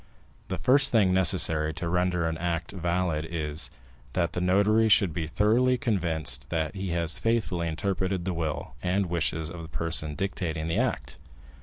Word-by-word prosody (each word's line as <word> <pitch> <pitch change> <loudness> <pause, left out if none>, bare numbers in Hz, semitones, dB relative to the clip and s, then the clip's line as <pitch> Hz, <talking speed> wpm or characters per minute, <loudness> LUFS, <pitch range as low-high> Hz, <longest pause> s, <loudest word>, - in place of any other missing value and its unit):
The - - -3
first 135 +2 +4
thing 100 -6 +3
necessary 80 -4 +2
to 85 0 -3
render 90 -1 0
an 80 - -2
act 85 -1 -2
valid 85 -3 -1
is, 75 -2 -2 0.4
that 85 -2 0
the 90 - -2
notary 100 +5 +3
should 100 -5 +4
be 80 0 -3
thoroughly 115 +9 +2
convinced 85 - -1
that 80 -1 -2
he 95 -1 -4
has 85 -1 0
faithfully 110 -7 0
interpreted 95 +2 -2
the 95 - -1
will 80 -2 -4
and 95 +2 0
wishes 80 -2 -1
of 85 -1 -8
the 80 - -9
person 80 -3 0
dictating 85 -4 -3
the 85 - -1
act. - - -2
85 Hz, 165 wpm, -27 LUFS, 80-95 Hz, 0.4 s, first